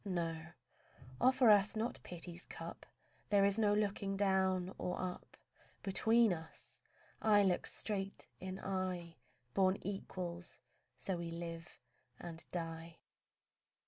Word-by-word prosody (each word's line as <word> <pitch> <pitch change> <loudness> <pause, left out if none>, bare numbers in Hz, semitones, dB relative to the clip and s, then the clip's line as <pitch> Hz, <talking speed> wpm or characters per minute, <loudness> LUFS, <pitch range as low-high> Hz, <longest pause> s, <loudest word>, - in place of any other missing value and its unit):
No, 165 -5 -2 0.7
offer 255 -3 +6
us 205 0 +5
not 225 +3 -1
pity's 175 0 -7
cup. - - -8 0.4
There 200 -1 +5
is 200 +2 +2
no 210 -2 +4
looking 200 -1 0
down 190 -1 +2
or 180 - -2
up 185 -1 -5 0.5
Between 220 +2 +4
us; 160 -1 -8 0.4
eye 210 -2 +6
looks 185 -2 +2
straight 195 -2 -2
in 185 0 -5
eye: 185 -3 -2 0.4
Born 190 0 +4
equals, 180 -3 -4 0.4
so 190 -2 -2
we 170 -1 -4
live 165 0 -6 0.4
and 165 -1 -6
die. 165 -1 -4
185 Hz, 115 wpm, -37 LUFS, 170-200 Hz, 0.7 s, offer